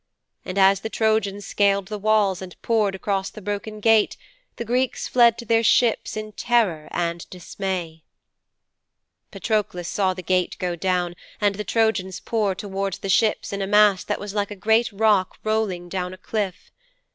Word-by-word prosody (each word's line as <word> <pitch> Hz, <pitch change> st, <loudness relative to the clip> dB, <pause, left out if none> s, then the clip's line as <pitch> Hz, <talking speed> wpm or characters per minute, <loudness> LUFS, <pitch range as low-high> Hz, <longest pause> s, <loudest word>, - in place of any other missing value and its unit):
And 185 Hz, -, -6 dB
as 195 Hz, 0 st, +5 dB
the 220 Hz, -, -5 dB
Trojans 215 Hz, -3 st, 0 dB
scaled 200 Hz, -1 st, +1 dB
the 210 Hz, -1 st, -4 dB
walls 205 Hz, -3 st, +2 dB
and 185 Hz, -2 st, -10 dB
poured 215 Hz, -4 st, +1 dB
across 195 Hz, 0 st, -2 dB
the -, -, -11 dB
broken 205 Hz, +1 st, -5 dB
gate, 220 Hz, 0 st, +3 dB, 0.4 s
the 235 Hz, -, -5 dB
Greeks 250 Hz, +2 st, -1 dB
fled 235 Hz, -2 st, +4 dB
to 235 Hz, -, -8 dB
their 225 Hz, 0 st, +3 dB
ships 230 Hz, -1 st, +2 dB
in 215 Hz, 0 st, -5 dB
terror 210 Hz, -9 st, 0 dB
and 170 Hz, 0 st, -3 dB
dismay.' 180 Hz, -2 st, -5 dB, 1.3 s
'Patroklos 205 Hz, -6 st, -2 dB
saw 190 Hz, -1 st, 0 dB
the 185 Hz, -, -7 dB
gate 180 Hz, 0 st, 0 dB
go 180 Hz, -1 st, -2 dB
down 180 Hz, 0 st, -1 dB, 0.3 s
and 205 Hz, -1 st, +2 dB
the 210 Hz, +2 st, -5 dB
Trojans 200 Hz, -5 st, 0 dB
pour 215 Hz, -5 st, -1 dB
towards 195 Hz, 0 st, -3 dB
the 195 Hz, -, -6 dB
ships 215 Hz, +2 st, +1 dB
in 200 Hz, -, -3 dB
a 195 Hz, -, -2 dB
mass 205 Hz, -2 st, +4 dB
that 210 Hz, -, -3 dB
was 205 Hz, -1 st, -6 dB
like 205 Hz, -1 st, -1 dB
a 205 Hz, -, -7 dB
great 220 Hz, +4 st, +2 dB
rock 205 Hz, -2 st, +2 dB
rolling 215 Hz, -5 st, -1 dB
down 180 Hz, 0 st, -4 dB
a -, -, -19 dB
cliff. 200 Hz, -2 st, -4 dB
200 Hz, 170 wpm, -23 LUFS, 185-220 Hz, 1.3 s, as